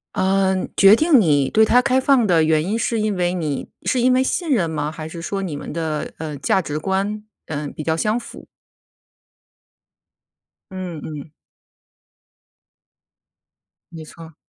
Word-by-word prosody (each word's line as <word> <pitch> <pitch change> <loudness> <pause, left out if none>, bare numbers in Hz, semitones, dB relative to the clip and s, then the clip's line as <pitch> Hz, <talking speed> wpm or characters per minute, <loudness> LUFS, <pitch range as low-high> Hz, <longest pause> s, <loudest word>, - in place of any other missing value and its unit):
呃， 190 -1 +2 0.2
决 195 +2 +8
定 305 +1 +4
你 145 -8 +2
对 220 0 +4
他 245 +3 +4
开 260 0 +2
放 260 -3 +3
的 175 -5 +3
原 155 0 +2
因 215 +5 -1
是 230 -1 -1
因 210 -2 -1
为 175 0 0
你 155 -6 -3 0.2
是 255 - 0
因 255 +1 +3
为 255 +1 +3
信 335 +4 -2
任 190 - +1
吗？ 150 -1 -2
还 155 0 -8
是 165 0 -8
说 195 +3 -3
你 170 -7 -4
们 145 - -7
的， 160 -2 -3
呃， 150 -2 -5
价 185 +7 +1
值 150 -1 -4
观， 195 +4 -2 0.3
呃， 150 -1 -4
比 155 - -6
较 160 +1 0
相 215 +5 0
符？ 240 - -10 2.2
嗯 185 -4 -6
嗯。 150 -1 -8 2.6
没 160 -1 -9
错。 165 0 -13
180 Hz, 165 characters per minute, -20 LUFS, 155-215 Hz, 2.6 s, 决